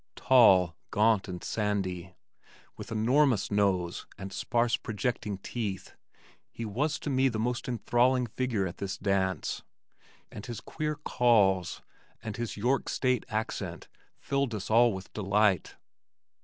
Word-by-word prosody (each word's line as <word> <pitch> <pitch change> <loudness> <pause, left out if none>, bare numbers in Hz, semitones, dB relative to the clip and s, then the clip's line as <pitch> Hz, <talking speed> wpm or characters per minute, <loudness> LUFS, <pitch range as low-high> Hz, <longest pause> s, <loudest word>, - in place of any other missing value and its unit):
Tall, 95 -9 +5
gaunt 105 -1 +2
and 90 -2 -6
sandy, 95 -4 -2 0.6
with - - -9
enormous 120 0 +2
nose 95 -4 0
and 95 0 -7
sparse 120 +3 +1
projecting 110 -2 -3
teeth, 100 -1 -5 0.6
he 115 - -6
was 140 +9 -1
to 145 - -4
me 130 0 +3
the 115 - -3
most 120 +2 -2
enthralling 125 +2 +2
figure 115 -3 -1
at 85 - -6
this 100 0 -4
dance 95 -2 -1 0.7
and 105 - -8
his 120 -2 -5
queer 150 -1 -3
"Calls" 105 - +2 0.4
and 110 -2 -5
his 120 -2 -4
"York 125 +6 0
State" 125 -2 0
accent 110 0 -4 0.3
filled 140 -4 -1
us 105 +1 -5
all 120 +1 +6
with 95 -1 -8
delight. 100 -2 +1
110 Hz, 130 wpm, -29 LUFS, 95-125 Hz, 0.7 s, all